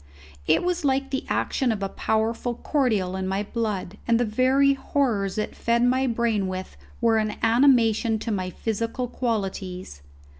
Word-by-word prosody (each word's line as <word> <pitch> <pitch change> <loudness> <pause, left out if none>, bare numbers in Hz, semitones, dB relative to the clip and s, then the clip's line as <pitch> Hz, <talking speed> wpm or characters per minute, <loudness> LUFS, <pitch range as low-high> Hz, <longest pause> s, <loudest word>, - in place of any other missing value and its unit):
It - - +3
was 360 -1 -1
like 270 -1 0
the 270 - -2
action 260 -4 0
of 205 -3 -3
a - - 0
powerful 225 +4 -1
cordial 220 -11 0
in 190 0 -3
my 195 +2 -1
blood, 210 -3 -3
and 230 -1 +3
the 245 - +2
very 260 +5 +3
horrors 235 -8 -1
it 215 - -3
fed 235 +1 +1
my 260 +2 +2
brain 230 -4 0
with 185 0 -5 0.3
were 230 -1 +3
an 215 -1 -1
animation 230 -2 +4
to 225 +1 -4
my 185 -3 -2
physical 230 +6 -3
qualities. 190 - -4
225 Hz, 160 wpm, -25 LUFS, 200-255 Hz, 0.3 s, animation